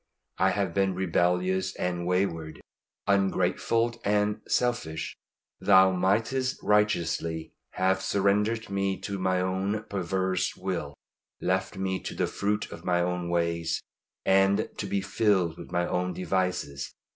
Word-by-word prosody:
I 95 +1 +4
have 95 -3 -1
been 95 -1 +1
rebellious 90 +1 +1
and 90 -1 -2
wayward, 85 -4 -1 0.5
ungrateful 115 +4 +1
and 105 +1 +1
selfish. 95 -11 -1 0.4
Thou 95 -1 +6
mightest 115 +8 +1
righteously 85 -6 +1 0.2
have 95 +1 +1
surrendered 105 +3 +1
me 100 -1 0
to 100 0 -4
my 95 0 +1
own 95 +3 -1
perverse 95 -2 -1
will; 85 -6 -4 0.4
left 95 +1 -1
me 95 0 -1
to - - -6
the - - +1
fruit 105 +1 -2
of - - -9
my 90 -1 +2
own 90 0 -1
ways, 85 -1 0 0.5
and 95 +1 +4
to - - -3
be 100 - 0
filled 95 -4 +1
with - - -10
my 90 -1 +1
own 90 0 -1
devices. 90 -6 -2
95 Hz, 130 wpm, -28 LUFS, 90-100 Hz, 0.5 s, Thou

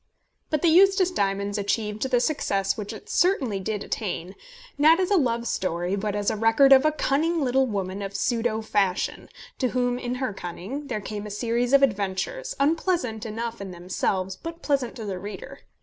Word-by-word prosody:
But 305 +1 -1
The - - +5
Eustace 380 +2 +5
Diamonds 200 - -1
achieved 210 +3 -1
the 250 -2 +3
success 200 -9 0
which 210 -2 -5
it - - -10
certainly 270 - +1
did 205 +1 -3
attain, 190 -4 -4 0.4
not 315 +4 +5
as 370 +1 0
a - - +5
love 235 -7 +1
story, 180 -1 -1
but 205 +1 -2
as 205 0 0
a - - -2
record 225 +6 +5
of 265 +2 +6
a 310 - +4
cunning 310 +3 0
little 265 +1 +2
woman 195 -3 -3
of 200 0 -5
pseudo 230 -2 0
fashion, 195 -4 -1 0.3
to 255 - +2
whom, 245 0 0
in 245 0 -3
her 255 -4 -2
cunning, 195 +11 -6
there 215 -5 -3
came 210 0 -6
a - - -7
series 235 +4 -1
of 275 0 +6
adventures, 230 - -1
unpleasant 280 - 0
enough 230 +1 -4
in 195 - -6
themselves, 185 +1 -2
but 330 0 -8
pleasant 270 -5 0
to 225 -4 -6
the 190 -3 -4
reader. 205 +8 -8
230 Hz, 185 wpm, -25 LUFS, 200-275 Hz, 0.4 s, of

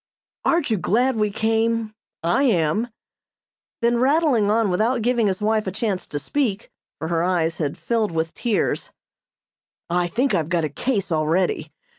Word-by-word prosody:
"Aren't 335 -7 +2
you 220 - +2
glad 245 +8 +1
we 210 -1 +2
came? 225 +1 0 0.3
I 200 +11 +2
am." 210 - +2 1.0
Then 235 0 +3
rattling 265 -5 +3
on 220 -2 +2
without 225 +6 +1
giving 240 -2 +2
his 190 +1 -1
wife 215 -1 +1
a - - -1
chance 200 -1 -2
to 145 - -4
speak, 220 - -2 0.3
for 160 - -4
her 165 -1 +1
eyes 170 -2 0
had 145 -3 -2
filled 225 -4 0
with 165 0 -2
tears: 240 - -1 1.0
"I 175 0 +2
think 250 +10 0
I've 160 -1 0
got 170 -2 +1
a - - -3
'case' 200 - -2
already. 160 0 0
210 Hz, 160 wpm, -22 LUFS, 170-235 Hz, 1.0 s, Then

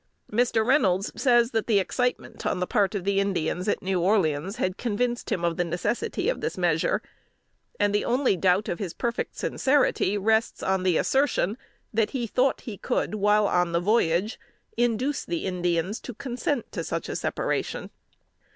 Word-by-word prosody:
Mr. 225 0 +2
Reynolds 200 -8 +2
says 240 -2 +3
that 225 -2 -1
the 220 -4 +4
excitement 245 +6 -1
on - - -1
the 180 - 0
part 200 +2 +1
of 195 - -2
the 195 +1 +1
Indians 185 -2 -1
at - - 0
New 185 -1 0
Orleans, 180 -2 +1
had 185 -7 -1
convinced 240 +2 -2
him 175 - 0
of 170 -1 0
the 175 - +2
necessity 175 +7 -2
of - - 0
this - - -3
measure; - - +1 0.8
and 205 0 +2
the 210 - +2
only 250 -3 +2
doubt 185 +3 +2
of 170 - -3
his 190 -6 -4
perfect 235 -2 -3
sincerity 260 -7 +1
rests 220 +3 +1
on 190 0 +1
the 180 -3 +2
assertion, 265 -7 +1 0.4
that 220 0 +2
he 240 - -1
thought 255 +4 +1
he 215 -4 -7
could, - - -1
while 210 0 +3
on 175 -2 +1
the 170 - +3
voyage, 195 +1 +1 0.4
induce 240 +4 0
the 170 -1 -3
Indians 180 +1 -1
to 245 - -8
consent 250 +1 -3
to - - -4
such - - -3
separation. - - -2
205 Hz, 170 wpm, -26 LUFS, 180-240 Hz, 0.8 s, the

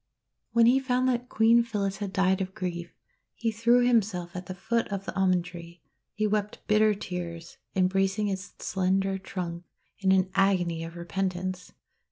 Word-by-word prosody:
When 235 -1 +6
he 250 +3 +5
found 255 -1 +1
that 245 0 -1
Queen 230 +2 +5
Phyllis 205 -4 -2
had 205 -2 -4
died 190 0 +2
of 190 +1 -4
grief, 175 -4 -4 0.4
he 230 -1 -1
threw 235 +3 +3
himself 195 -7 +1
at 180 -1 -6
the 185 - -5
foot 230 +5 -1
of 200 -1 -4
the - - -5
Almond 185 -2 +2
tree. 170 -1 -11 0.3
He 215 - 0
wrept 210 0 -1
bitter 215 0 +4
tears, 170 -3 -6 0.2
embracing 195 +2 +2
its 195 0 -4
slender 195 +1 0
trunk 180 -3 -5 0.4
in 190 -2 +2
an 190 0 +3
agony 180 -4 +2
of 165 +1 -8
repentance. 185 +1 -3
195 Hz, 165 wpm, -28 LUFS, 180-215 Hz, 0.4 s, When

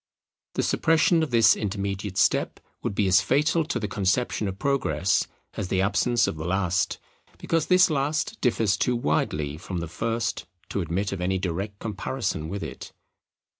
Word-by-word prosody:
The - - +1
suppression 165 +1 +3
of 160 - -1
this 115 -2 +5
intermediate 100 -1 -3
step - - +2 0.2
would 100 - -3
be 105 - +2
as 95 0 +5
fatal 160 +3 +2
to - - -2
the 105 - -2
conception 105 +2 0
of 95 0 -4
Progress 95 - +1 0.3
as 100 - -4
the 95 0 +1
absence 115 +5 +2
of - - -3
the 80 - -5
last; 95 0 0 0.4
because 165 -2 0
this 185 0 +6
last 150 +9 -1
differs 115 -5 +2
too 125 - +1
widely 75 -10 -1
from 90 +2 -6
the 85 -1 -3
first 115 +5 -2 0.2
to 100 - -1
admit 90 +4 -2
of 95 -2 -4
any 95 +1 0
direct 95 +3 -3
comparison 105 -5 -3
with 100 +2 -4
it. - - -8
100 Hz, 170 wpm, -25 LUFS, 95-125 Hz, 0.4 s, this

